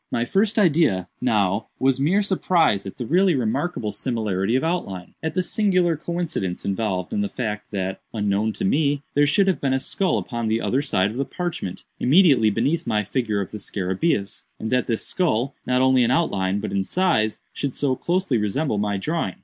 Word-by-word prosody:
My 120 - 0
first 205 - +1
idea, 160 - +3
now, 105 -4 +1
was 135 0 +2
mere 180 +9 +2
surprise 170 - +2
at 95 - -8
the 120 - -4
really 180 - +3
remarkable 125 0 -1
similarity 110 -4 -1
of 130 - +1
outline—at 160 - -3
the 185 - +1
singular 185 -4 +2
coincidence 160 - -3
involved 95 -2 -2
in 210 - 0
the 205 - -1
fact, 105 - -4
that 95 -2 -3
unknown 105 0 0
to 195 - -3
me, 145 -5 +1
there 145 0 +4
should 195 +7 +3
have 190 -2 0
been 135 -1 +1
a - - +1
skull 185 +7 0
upon 120 -3 -3
the 110 +1 +1
other 130 +3 0
side 100 -8 +1
of 115 - -7
the 135 - +1
parchment, 165 - -5 0.2
immediately 140 - +5
beneath 140 +11 0
my 105 -1 +1
figure 110 -1 -1
of 95 - -6
the 105 - -6
scarabæus, 100 - -2
and 110 - -4
that 125 -1 +1
this 115 -2 -1
skull, 140 - 0
not 125 +1 +2
only 130 -1 +4
in 120 - +2
outline, 100 - +1
but 110 - -4
in 100 -1 0
size, 110 - +1
should 140 -3 -3
so 135 -3 +1
closely 175 -5 0
resemble 105 +3 -1
my 105 -1 0
drawing. 160 - -2
125 Hz, 190 wpm, -23 LUFS, 105-165 Hz, 0.2 s, immediately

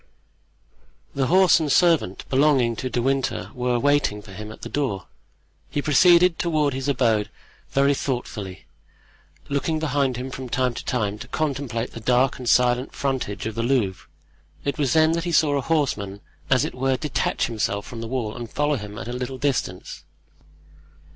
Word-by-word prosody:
The 135 -2 0
horse 185 0 +5
and 155 -3 -1
servant 160 - +2
belonging 135 -4 +3
to 130 - -3
De 120 -1 -1
Winter 135 0 -1
were 125 -1 0
waiting 145 -5 +2
for 105 - -13
him 105 +2 -8
at - - -13
the - - -4
door; 110 -11 -2 0.6
he - - -2
proceeded 170 +4 +5
toward 155 -5 +1
his 135 +1 -3
abode 115 -6 +2 0.4
very 140 +1 +3
thoughtfully, 110 -9 -4 0.8
looking 145 +3 -1
behind 140 -5 0
him 130 +2 -5
from 130 0 -6
time 125 0 0
to 125 - -3
him 105 +1 -4
to 125 - -8
contemplate 135 -6 -2
the - - -8
dark 125 +4 +2
and 125 -2 -2
silent 125 +1 +2
frontage 130 -8 -2
of 110 - -3
the 115 - -2
Louvre. 115 -7 0 0.6
It 140 -1 -2
was 140 -4 +1
then 160 0 +5
that 165 0 -1
he 175 - -1
saw 150 -3 +3
a 140 - +1
horseman, 115 -10 -1 0.3
as 130 -2 +3
it - - -5
were, 130 +1 0
detach 150 0 -1
himself 105 -3 -2
from 115 -2 -8
the 115 - -5
wall 115 -3 -3
and 120 -2 -6
follow 145 0 +1
him 105 -2 -8
at - - -6
a 120 - -4
little 125 +1 -4
distance. 130 -9 -2
130 Hz, 175 wpm, -23 LUFS, 115-145 Hz, 0.8 s, horse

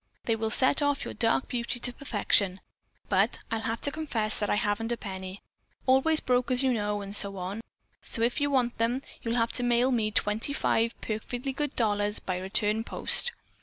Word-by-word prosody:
They 225 - +1
will 220 0 -2
set 260 +6 +5
off 285 -1 0
your - - -5
dark 230 +3 +1
beauty 240 0 -2
to 245 - +2
perfection. 200 -7 0 0.5
But - - +2
I'll 225 - 0
have 225 0 -3
to 285 - -1
confess 235 -9 0
that 205 - -1
I - - +2
haven't 210 +3 -1
a 240 - -1
penny. 190 -2 -7 0.4
Always 270 +5 +4
broke, 250 +1 +1
as 255 +1 +1
you 260 -1 +3
know, 210 -2 -1
and 200 0 -3
so, 195 -2 -1 0.7
if 240 +5 0
you 285 - +2
want 250 -4 0
them, 240 +4 0 0.2
you'll 230 0 -2
have 230 -1 +1
to 245 - 0
mail 245 +2 +2
me 225 -4 +1
twenty 215 +5 +1
five 230 -4 0
perfectly 245 +5 -4
good 295 +1 -3
dollars 205 -2 0
by 185 -1 -3
return 210 +3 +1
post. 485 - +2
230 Hz, 190 wpm, -28 LUFS, 210-255 Hz, 0.7 s, set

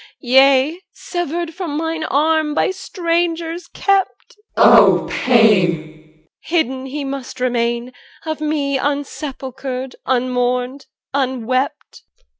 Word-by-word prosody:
Yea, 270 +6 +4
severed 345 -1 -4
from 330 -4 -4
mine 325 0 -2
arm, 310 +1 +1
By - - +2
strangers 340 -2 -2
kept 395 -1 -1
CH. - - -22 0.2
14. - - +7
O - - +4
pain! 220 -7 +4
EL. 155 -1 -9
Hidden 265 -6 -1
he 285 +2 -4
must 270 -2 -6
remain, 240 0 -1 0.3
Of 315 -1 -4
me 290 -3 0
unsepulchred, 265 -2 -4
unmourned, 250 +1 -1 0.3
unwept. 260 -1 -2
275 Hz, 105 wpm, -18 LUFS, 250-320 Hz, 0.3 s, 14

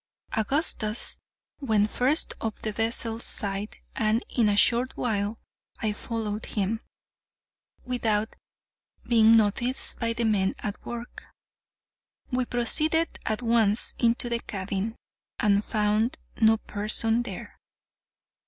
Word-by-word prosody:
Augustus 220 -2 0 0.4
went 220 -7 +2
first 270 +6 +1
up 220 -2 -2
the 215 - -3
vessel's 225 +1 0
side, 200 +1 +2 0.2
and 220 +2 +1
in 225 -4 +2
a 205 - +1
short 245 +4 +3
while 210 -2 -1 0.4
I 215 -1 -1
followed 215 0 -4
him, 215 +2 -2 1.0
without 225 -4 -1 0.7
being 225 -1 +6
noticed 235 +4 +1
by 230 -1 0
the 235 - -2
men 195 -3 +1
at 205 -1 -6
work. 240 0 -8 1.1
We 255 0 0
proceeded 305 +8 +1
at 220 +2 -1
once 225 -2 +2
into 235 +1 +2
the 235 -1 -1
cabin, 200 +1 -4 0.4
and 205 -2 +3
found 215 +2 0 0.2
no 220 0 +5
person 220 +2 +1
there. 240 - -8
225 Hz, 115 wpm, -26 LUFS, 210-235 Hz, 1.1 s, being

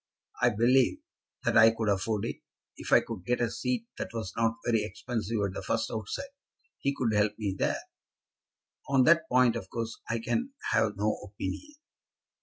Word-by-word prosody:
I 125 - +6
believe 120 +3 +3 0.5
that - - +1
I 115 0 +9
could 115 -1 -2
afford 105 +1 0
it, - - -4 0.4
if - - -8
I - - +7
could 110 -6 -7
get 125 +6 0
a 120 -2 0
seat 245 -3 -2
that - - -3
was 110 -5 -4
not 115 0 +1
very 115 -2 +2
expensive 110 +2 -3
at 95 - -3
the - - -5
first 110 +3 -1
outset. 110 - -4 0.5
He 140 0 0
could 115 -5 0
help 105 0 +2
me 100 -3 -2
there." - - -1 1.1
"On 135 -2 +5
that 165 +2 +4
point, 125 -2 +4
of 95 - -5
course, 115 -1 -4
I 115 - +1
can 245 - -2 0.2
have 105 -2 +2
no 105 +1 +1
opinion." 105 - -6
115 Hz, 180 wpm, -29 LUFS, 105-125 Hz, 1.1 s, I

